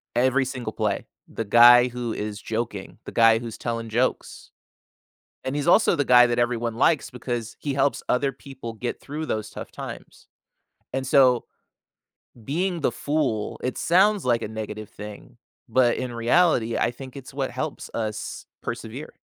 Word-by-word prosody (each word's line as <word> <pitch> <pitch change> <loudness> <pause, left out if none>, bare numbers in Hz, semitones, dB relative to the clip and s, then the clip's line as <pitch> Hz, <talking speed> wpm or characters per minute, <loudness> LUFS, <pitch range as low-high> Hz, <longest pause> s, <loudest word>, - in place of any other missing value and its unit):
every 130 +2 +3
single 125 -4 -5
play. 105 -3 -1 0.2
The 115 - -5
guy 120 +3 +8
who 120 -2 -4
is 105 0 -5
joking, 110 -3 -4
the - - -7
guy 115 -1 +5
who's 115 -2 -7
telling 115 -1 -4
jokes. 120 +4 -2 0.9
And 130 +2 -2
he's 145 - -2
also 210 +6 +5
the 145 - +1
guy 125 -1 +7
that 120 0 -1
everyone 120 -1 0
likes, 140 +2 +2
because 120 -2 -5
he 140 -2 -3
helps 140 +1 +1
other 135 +2 +1
people 130 -3 -9
get 120 +2 -4
through 150 +3 -5
those 110 -4 -3
tough - - -8
times. - - -9 0.6
And 135 +1 -2
so, 130 -2 +5 1.0
being 175 - -1
the 140 - +1
fool, 135 -6 -1
it 125 - -2
sounds 195 +3 +3
like 120 -2 +2
a - - -3
negative 110 -1 -6
thing, 105 0 -10 0.3
but 125 -2 +3
in 125 -1 -3
reality 120 -1 +2
I - - +2
think 130 +1 -10
it's 135 0 -10
what 135 -1 -2
helps 155 -2 -5
us 110 -2 -4 0.2
persevere. 120 +5 -6
120 Hz, 160 wpm, -24 LUFS, 115-135 Hz, 1.0 s, guy